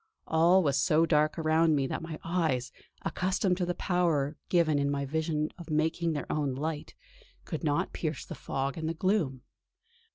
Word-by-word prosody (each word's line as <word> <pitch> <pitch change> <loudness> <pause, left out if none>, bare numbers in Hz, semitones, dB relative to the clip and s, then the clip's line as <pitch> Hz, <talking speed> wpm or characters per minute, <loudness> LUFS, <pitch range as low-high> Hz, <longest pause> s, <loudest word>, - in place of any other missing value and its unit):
All 170 +4 +4
was 140 -2 +2
so 160 +2 +4
dark 155 -1 +2
around 160 0 +3
me 140 -2 +1
that 135 - -3
my 160 -1 -6
eyes, 160 -8 0 0.3
accustomed 185 0 0
to 180 -2 -1
the 175 - -1
power 165 -6 +1
given 160 -5 +3
in 140 0 +1
my 140 0 -1
vision 155 +1 -1
of 170 -1 -9
making 160 +2 +1
their 145 - -3
own 145 -4 0
light, 150 +2 -4 0.5
could 160 - -5
not 145 -2 0
pierce 155 -3 -3
the - - -7
fog 135 +3 -3
and 160 0 -2
the 165 - -3
gloom. 160 -9 0
160 Hz, 175 wpm, -29 LUFS, 145-170 Hz, 0.5 s, All